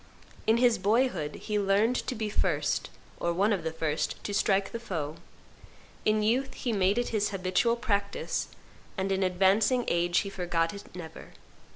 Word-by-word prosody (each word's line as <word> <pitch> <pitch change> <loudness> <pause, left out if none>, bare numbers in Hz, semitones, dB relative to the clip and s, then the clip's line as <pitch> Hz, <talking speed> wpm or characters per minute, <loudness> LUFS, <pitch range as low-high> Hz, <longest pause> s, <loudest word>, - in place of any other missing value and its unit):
In 220 +1 +5
his 240 -3 +4
boyhood 200 - +1
he 210 -1 -2
learned 205 +5 +2
to 255 - -2
be 220 -1 -2
first, 210 - 0 0.3
or 170 - 0
one 200 +5 +2
of 185 -5 -2
the 160 - -2
first, 160 -1 -1
to 205 - -4
strike 195 -1 +2
the 230 - -4
foe; 160 -9 -4 0.9
in 215 0 +3
youth 260 +5 +1
he 240 - -2
made 195 +1 +2
it 240 - 0
his 210 -2 0
habitual 195 +4 +1
practice; 200 -4 -1 0.5
and 190 +1 -1
in 190 0 +1
advancing 195 +7 +3
age 175 0 +2
he 200 - -5
forgot 175 -2 -1
it 200 - -9
never. 165 -3 -9
200 Hz, 170 wpm, -29 LUFS, 180-225 Hz, 0.9 s, In